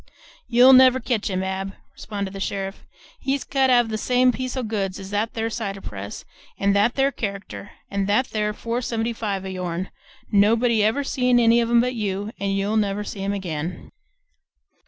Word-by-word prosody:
"You'll 250 +2 +7
never 260 0 +7
ketch 230 -4 -1
him, 185 -1 -1
Ab," 190 +1 -3 0.2
responded 200 -2 -5
the 195 - -6
sheriff. 195 0 -4 0.3
"He's 275 0 -1
cut 270 -1 +1
off 240 -2 +4
the 215 0 -3
same 250 +1 +3
piece 255 +1 -4
o' 260 - -1
goods 200 -4 -2
as 195 0 -9
that 210 +2 -1
there 225 0 -1
cider 200 -4 -4
press 100 - -7 0.3
and 200 0 +2
that 205 +4 +3
there 275 0 +2
character 200 -3 -6 0.2
and 200 -1 -2
that 215 +6 +1
there 210 -1 0
four 230 +3 -3
seventy 230 -1 -2
five 200 -4 -3
o' - - -4
yourn; 180 -1 -4 0.4
nobody 220 +2 +3
ever 225 +7 +1
see 250 -2 -1
any 235 -1 +5
of 230 - -1
'em 235 0 +5
but 250 +1 -1
you, 205 -2 -3
and 195 0 -1
you'll 205 +3 0
never 205 -1 0
see 200 -1 -6
'em 200 +1 -1
again!" 170 -3 -5
210 Hz, 190 wpm, -23 LUFS, 195-240 Hz, 0.4 s, You'll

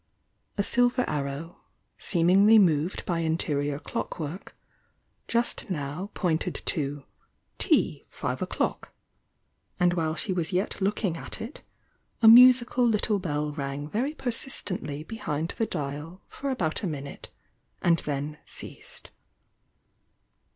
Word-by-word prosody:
A 200 - +2
silver 245 +3 +2
arrow, 145 +4 -4 0.4
seemingly 195 +5 +5
moved 170 -3 +2
by 170 -2 0
interior 145 -3 0
clockwork, 160 +3 -5 0.7
just 235 -2 -1
now 155 +3 -4
pointed 175 -1 0
to 145 -2 0 0.6
"Tea, - - +2
five - - -4
o'clock," - - -2 0.9
and 180 0 +4
while 160 -2 0
she 190 - -1
was 170 -3 -1
yet 190 +2 -1
looking 195 -3 0
at - - -3
it, 230 +6 -7 0.6
a 225 - +5
musical 250 +1 +8
little 210 -2 +2
bell 150 -4 -2
rang 140 0 -4
very 255 - -2
persistently 205 - -2
be 225 +7 -8
hind 155 -3 -2
the 225 - +1
dial 150 +3 -5
for 280 - -5
about 170 -12 0
a 200 - -1
minute, 140 -3 -6 0.5
and 170 -1 +3
then 150 +1 -4
ceased. - - -6
170 Hz, 120 wpm, -27 LUFS, 150-210 Hz, 0.9 s, musical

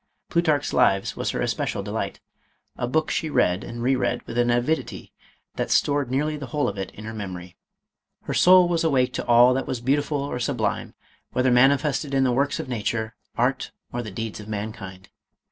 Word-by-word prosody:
Plutarch's 155 -4 +1
Lives, 95 0 +2
was - - -2
her - - -1
es - - 0
pecial - - -3
delight - - -4 0.3
— - - -45
a 120 - -2
book 155 +5 0
she 160 - -1
read 105 -9 +2
and 120 0 -6
re 130 +2 +3
read 120 -1 -1
with 115 - -7
an 120 0 +3
avidity 120 +7 -1 0.4
that - - -1
stored 145 -3 +2
nearly 150 +4 0
the 145 -3 -6
whole 145 +4 0
of 100 - -3
it 95 -1 -4
in 105 - -9
her 110 - -6
memo 100 -4 -5
ry. 90 +1 -12 0.7
Her - - -4
soul 180 0 +6
was 170 -1 0
awake 135 -6 +2
to - - -3
all 120 +1 +6
that 135 +1 -2
was 130 - -2
beautiful 145 +4 0
or 140 -3 -4
sublime, 120 - -2 0.4
whether 125 0 +2
manifested 140 +3 +3
in 135 - +3
the 130 - +2
works 140 +4 0
of - - -4
nature, 110 -2 -2 0.2
art, 125 +3 0 0.2
or 120 - -2
the 110 - -6
deeds 110 +3 -5
of 105 - -10
mankind. 100 -3 -6
125 Hz, 205 wpm, -24 LUFS, 110-145 Hz, 0.7 s, soul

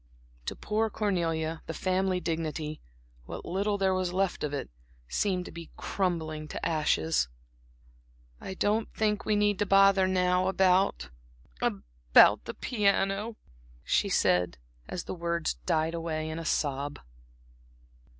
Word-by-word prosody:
To - - -2
poor 220 +1 0
Cornelia 165 -6 -1
the 160 - -4
family 185 +1 0
dignity 160 -2 -3 0.5
what - - -7
little 200 +3 0
there 190 -1 +2
was 185 -1 0
left 190 0 0
of 150 - -1
it 140 - -4 0.4
seemed 185 - 0
to - - -8
be 170 -1 -9
crumbling 160 -5 -2
to - - -5
ashes. 80 - +1 1.1
"I 190 - -6
don't 215 +4 0
think 210 -2 0
we 215 - +2
need 205 -1 +2
to 205 - +1
bother 195 -1 +5
now 180 0 +2
about 190 - +2 0.5
about - - +4
the - - -6
piano," 205 -1 0 0.5
she - - +1
said, 90 -7 +2 0.3
and 180 - -5
the - - -6
words 170 - -1
died 160 +1 +1
away 160 -2 -3
in 160 - -4
a 165 - -6
sob. 145 -1 -1
180 Hz, 135 wpm, -29 LUFS, 155-195 Hz, 1.1 s, bother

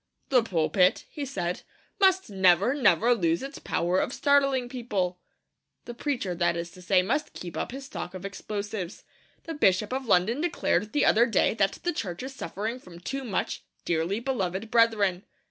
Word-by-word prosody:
'The 255 -2 +5
pulpit,' 180 -2 +2
he 295 - -5
said, 180 -10 -3 0.4
'must 380 -1 +4
never, 190 +4 +4
never 235 - +4
lose 170 -3 0
its 275 +2 -7
power 180 +2 0
of - - -1
startling 275 -3 +2
people!' 205 -8 -2 0.7
The 240 - -6
preacher, 240 -7 -2
that 175 0 +1
is 170 0 -5
to 180 - -14
say, 185 0 +3
must 265 +10 -1
keep 175 -1 -7
up - - -3
his 270 +2 -7
stock 190 -8 -6
of 185 +1 -7
explosives. 200 -1 -5 0.4
The 330 - -5
Bishop 210 -5 +2
of 260 -1 -3
London 220 +8 +3
declared 215 - 0
the 295 - +3
other 235 +3 +5
day 220 - +2
that 195 -3 +1
the 350 - 0
Church 185 - -4
is 265 +1 -6
suffering 225 -1 -4
from 180 -7 -13
too 270 +10 -5
much 210 -7 -2 0.2
'dearly 170 +5 0
beloved 220 -5 -2
brethren.' 210 -6 +3
210 Hz, 175 wpm, -27 LUFS, 180-255 Hz, 0.7 s, The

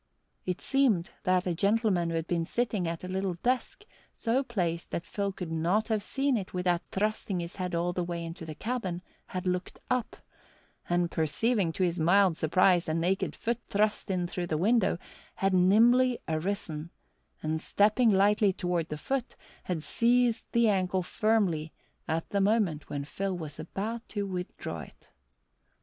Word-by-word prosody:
It 180 -1 -2
seemed 245 -11 +2
that 185 0 +3
a 180 - 0
gentleman 200 -2 +2
who 165 - -2
had 165 -1 -1
been 170 -1 0
sitting 215 -5 0
at 165 +1 -4
a - - -4
little 190 -1 -1
desk, 255 - -1 0.3
so 235 +3 0
placed 180 -10 -2
that 170 - -3
Phil 200 -1 -2
could 180 -3 -6
not 175 +8 +1
have 215 -2 +1
seen 270 +4 +1
it 190 -3 -6
without 180 -1 +1
thrusting 205 -2 -1
his 170 +2 -6
head 180 -2 -2
all 175 +1 0
the 180 - -1
way 170 -1 -4
into 165 0 -7
the 155 -1 -7
cabin, 190 -5 -3 0.2
had 185 0 -5
looked 180 0 -2
up, 250 -3 0 0.7
and, 175 0 +1
perceiving 170 +5 +1
to 185 - 0
his 175 -1 0
mild 180 +2 +4
surprise 175 +2 +3
a 155 - 0
naked 180 +4 0
foot 235 +1 -2
thrust 210 +1 +1
in 180 -2 0
through 175 0 -3
the 155 - 0
window, 205 +2 +3 0.4
had 195 0 +1
nimbly 235 +7 +5
arisen, 160 -1 -3 0.5
and 155 0 -1
stepping 215 +6 +3
lightly 205 +1 +4
toward 175 -3 -2
the 150 - -4
foot, 265 - -3 0.3
had 170 -4 -2
seized 240 +6 +2
the 235 -1 +4
ankle 185 -2 +1
firmly 180 -6 +1 0.4
at 160 +1 -1
the 200 - +2
moment 195 -7 +1
when 140 -1 -3
Phil 190 +4 -3
was 155 -3 -7
about 215 +8 -4
to 205 -2 -2
withdraw 180 -2 -5
it. - - -13
185 Hz, 170 wpm, -29 LUFS, 170-215 Hz, 0.7 s, nimbly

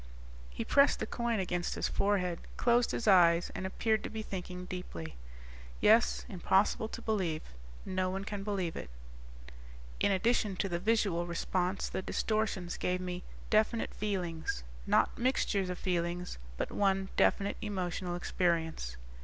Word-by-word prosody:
_He - - -3
pressed 280 0 +5
the - - -2
coin 235 -2 -1
against 175 -2 -1
his - - 0
forehead, 180 -4 +1 0.2
closed 240 0 +3
his 230 - -2
eyes 175 -3 +6
and 190 - -3
appeared 220 +3 0
to - - -4
be 220 0 -5
thinking 180 -2 -6
deeply. 85 - -6 0.6
"Yes, 225 +3 +4
impossible 195 +1 +2
to - - -8
believe. 185 -8 0 0.4
No 185 0 0
one 195 +1 -3
can 205 -1 -4
believe 190 -5 -2
it."_ - - -6 1.1
"In - - +3
addition 205 0 +2
to 195 - -1
the 170 -2 -2
visual 195 -4 +1
response, 180 +2 -1
the - - -3
distortions 215 -3 -1
gave 180 0 0
me 180 0 -4 0.3
definite 220 +1 +2
feelings. 175 - -2 0.2
Not - - +3
mixtures 220 -6 +1
of 180 - -3
feelings, 175 - -2 0.2
but - - -2
one 195 -1 +1
definite 200 0 +2
emotional 185 -4 -2
experience." 165 - -1
185 Hz, 145 wpm, -32 LUFS, 175-210 Hz, 1.1 s, eyes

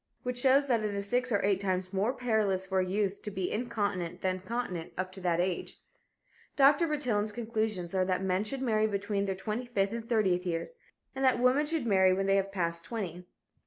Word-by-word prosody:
Which 250 0 -2
shows 270 +2 +4
that 235 -5 +1
it 210 -1 -2
is 200 0 0
six 250 +3 +1
or 205 -3 +2
eight 200 -2 +2
times 185 -1 -2
more 200 +5 +1
perilous 220 -7 0
for 190 -1 0
a 185 - 0
youth 200 +1 -1
to - - -5
be 190 -2 -3
incontinent 205 -6 -2
than 185 0 0
continent 185 -4 -4
up 185 0 -2
to 190 0 -10
that 175 -2 +1
age. 180 0 -2 0.8
Dr. 285 +4 +5
Bertillon's 240 -9 0
conclusions 220 -6 -2
are 190 -1 +2
that 185 0 0
men 190 +1 +1
should 265 +5 -3
marry 220 -3 +2
between 200 -1 -1
their 195 -1 -2
twenty 215 +5 -4
fifth 200 -4 0
and 230 0 -6
thirtieth 190 -6 +2
years, 170 - -3 0.4
and 270 0 -3
that 260 -2 +4
women 260 +4 +3
should 315 -4 -1
marry 190 -4 +4
when 195 +1 0
they 195 0 +3
have 195 0 -1
passed 170 -3 -2
twenty. 180 -6 -5
200 Hz, 210 wpm, -30 LUFS, 185-235 Hz, 0.8 s, Dr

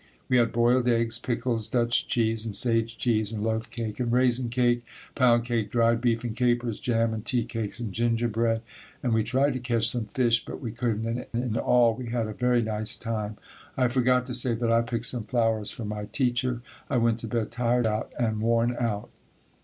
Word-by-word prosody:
We 125 - +4
had 120 -2 +2
boiled 120 +1 +2
eggs, 115 -1 +3
pickles, 115 -2 -2
Dutch 120 -1 +2
cheese 115 -2 +1
and 110 -3 -2
sage 115 +1 +3
cheese 110 -3 +1
and 105 -2 -4
loaf 110 +1 -2
cake 115 -2 -5
and 120 -2 -1
raisin 125 0 +2
cake, 120 0 +1 0.3
pound 120 -3 +3
cake, 115 -4 -1
dried 115 0 +2
beef 120 -1 0
and 115 -2 -4
capers, 120 -2 0
jam 115 -2 0
and 110 -1 -5
tea 120 0 -1
cakes 115 -2 -4
and 110 -5 -5
gingerbread, 115 0 0 0.4
and 120 - 0
we 110 -1 +2
tried 130 +5 +1
to 130 - -3
catch 120 -2 0
some 120 -3 +3
fish 120 -1 +1
but - - -8
we 120 -4 -5
couldn't, 115 -2 -2
and 115 +2 -3
in 120 -2 -2
all 120 -1 +3
we 120 +2 -7
had 115 -1 -1
a 110 - -5
very 125 +2 +1
nice 110 0 +1
time. 110 -2 -4 0.4
I 125 -2 +2
forgot 125 0 +2
to 125 - -5
say 120 -1 +4
that 115 0 0
I 115 - +4
picked 115 -1 -3
some 120 -4 +3
flowers 115 -3 0
for 115 - -4
my 105 0 -5
teacher. 120 +1 -1 0.3
I 130 - +1
went 115 -1 +1
to 115 - -6
bed 110 -1 -2
tired 120 0 0
out 110 0 -2
and 110 -3 -1
worn 115 +1 +1
out." 110 -4 -3
115 Hz, 210 wpm, -26 LUFS, 115-120 Hz, 0.4 s, We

